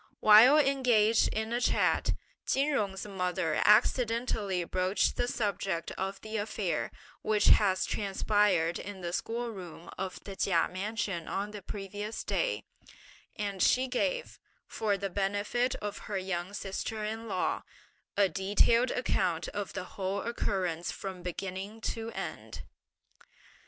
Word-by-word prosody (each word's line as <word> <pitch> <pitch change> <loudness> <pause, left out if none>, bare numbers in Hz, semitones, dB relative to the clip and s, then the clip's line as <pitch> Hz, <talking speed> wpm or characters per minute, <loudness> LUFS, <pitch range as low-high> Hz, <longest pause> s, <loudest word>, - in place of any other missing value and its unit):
While 225 +7 +8
engaged 250 -6 +4
in 220 +1 -2
a 240 - 0
chat, - - +2 0.3
Chin 275 +3 +2
Jung's 200 -9 -1
mother 180 -5 -1
accidentally 220 -3 +3
broached 185 +3 +1
the 245 - 0
subject 195 -7 -2
of 195 +1 -4
the 220 0 -4
affair, 210 +1 -2 0.3
which 215 -1 +3
had 195 -3 +5
transpired 195 -4 +1
in 200 -1 -7
the 175 0 -4
school 235 +4 -2
room 175 -4 -9
of 190 -1 -4
the 195 - -7
Chia 175 -4 +2
mansion 195 -3 -3
on 205 +2 -2
the 210 -1 -7
previous 205 +3 -5
day, - - -1 0.7
and 200 -3 -3
she 260 +1 +4
gave, - - -1 0.3
for 205 -2 -1
the 195 0 -3
benefit 205 +6 0
of 205 -1 -4
her 200 - -1
young 185 0 -3
sister 210 +2 -3
in 225 +2 -4
law, 185 -4 -1 0.6
a 200 -1 +5
detailed 205 +7 +3
account 180 -10 0
of 205 -1 -5
the - - -4
whole 195 +1 -3
occurrence 185 -7 -1
from 190 -2 -6
beginning 190 +4 -5
to 225 0 -3
end. - - -6
205 Hz, 135 wpm, -30 LUFS, 190-225 Hz, 0.7 s, While